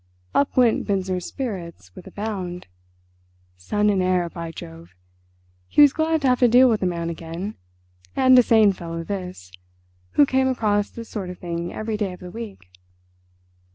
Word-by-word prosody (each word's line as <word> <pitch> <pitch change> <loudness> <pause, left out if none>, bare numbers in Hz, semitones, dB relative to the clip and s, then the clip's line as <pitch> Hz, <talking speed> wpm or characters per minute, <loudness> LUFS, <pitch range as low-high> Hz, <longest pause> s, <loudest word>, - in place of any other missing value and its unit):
Up 280 -1 +1
went 240 -3 +3
Binzer's 185 -3 -1
spirits 170 - -6
with - - -12
a - - -11
bound. 190 -4 -5 0.9
Son 205 - -1
and 195 -2 +1
heir, 180 -1 +1
by 170 -1 -6
Jove! 85 - -11 0.7
He - - +4
was 285 -1 +6
glad 320 0 +1
to - - +3
have 250 - +2
to 245 - +5
deal 250 +2 +6
with 220 - 0
a 185 - +1
man 170 -1 -2
again. 170 +5 -6 0.6
And 260 -1 +5
a - - +9
sane 220 -4 +4
fellow 165 -2 -6
this, 180 - -6 0.6
who 290 - +6
came 265 -1 +1
across 210 -5 +1
this 230 -1 -9
sort 195 -4 -5
of 180 - -8
thing 170 0 -4
every 215 0 -3
day 200 -3 -2
of 180 - -12
the 180 -1 -9
week. 220 - -8
195 Hz, 175 wpm, -23 LUFS, 170-230 Hz, 0.9 s, a